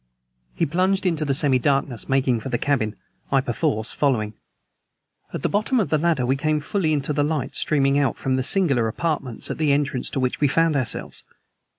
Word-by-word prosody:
He - - +1
plunged 185 +5 +1
into 160 -4 0
the 140 -2 0
semi 135 -2 +2
darkness, 135 -3 -1
making 130 -3 +2
for 120 - -6
the 120 - 0
cabin, 115 -6 0 0.4
I 135 - +4
perforce 115 -3 -1
following. 115 -7 0 1.0
At - - -5
the - - +3
bottom 215 +5 +1
of 205 - 0
the 155 - +2
ladder 160 -6 +1
we 130 +2 +2
came 155 +2 0
fully 160 +2 -1
into 150 0 0
the 145 - +1
light 150 -3 -2
streaming 140 -2 +2
out 140 - 0
from 130 -1 -1
the 130 - 0
singular 135 - +2
apartments 135 -1 -2
at - - -5
the 155 -2 +2
entrance 140 -2 0
to - - -3
which 130 +2 -1
we 145 - +5
found 165 +2 +2
ourselves. 130 -4 -2
140 Hz, 200 wpm, -23 LUFS, 130-155 Hz, 1.0 s, we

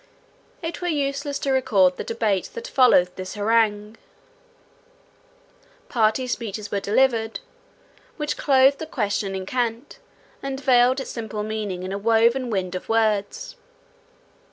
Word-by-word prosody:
It 330 +2 -5
were 355 - -2
useless 285 -2 -1
to 275 - -2
record 210 -9 +3
the - - -4
debate 220 -4 -1
that 470 +1 -6
followed 215 - +4
this 185 +1 -6
harangue. 210 0 +1 1.9
Party 225 +2 +1
speeches 215 -4 -4
were 200 - 0
delivered, 225 +2 +1 0.8
which 300 -2 -2
clothed 270 0 +4
the 320 - -5
question 205 -6 -2
in 190 0 -4
cant, 245 - -3 0.4
and 270 -1 -4
veiled 255 -1 +4
its 270 - -6
simple 220 -2 -5
meaning 210 -4 -4
in 185 - -5
a 200 - -3
woven 230 +4 +2
wind 190 -4 -2
of 185 - -6
words. 225 - 0
225 Hz, 130 wpm, -23 LUFS, 205-265 Hz, 1.9 s, followed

